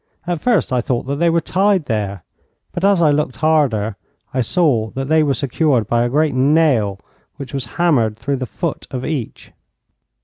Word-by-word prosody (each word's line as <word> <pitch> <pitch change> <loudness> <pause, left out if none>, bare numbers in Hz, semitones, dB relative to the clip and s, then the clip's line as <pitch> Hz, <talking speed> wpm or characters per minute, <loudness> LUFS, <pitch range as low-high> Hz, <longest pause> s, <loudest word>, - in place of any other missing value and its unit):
At 175 -3 -2
first 225 - +1
I 125 - +2
thought 120 0 -2
that 140 +2 -3
they 170 +2 +2
were 165 0 +2
tied 190 0 +1
there, 100 - -3 0.5
but 175 - -5
as 195 -3 +4
I 150 - +5
looked 145 -4 0
harder 120 -8 +1 0.4
I 130 - +1
saw 120 -5 +1
that 135 +1 -3
they 160 0 +4
were 140 -3 +1
secured 135 -1 +1
by 120 +1 +1
a 120 - 0
great 150 +2 +1
nail 130 -7 +2 0.4
which 140 -2 -9
was 135 -3 -3
hammered 130 -11 +2
through 135 +4 -2
the 130 -1 -4
foot 170 +3 -4
of 130 -1 -5
each. 140 -8 -5
140 Hz, 190 wpm, -18 LUFS, 120-160 Hz, 0.5 s, I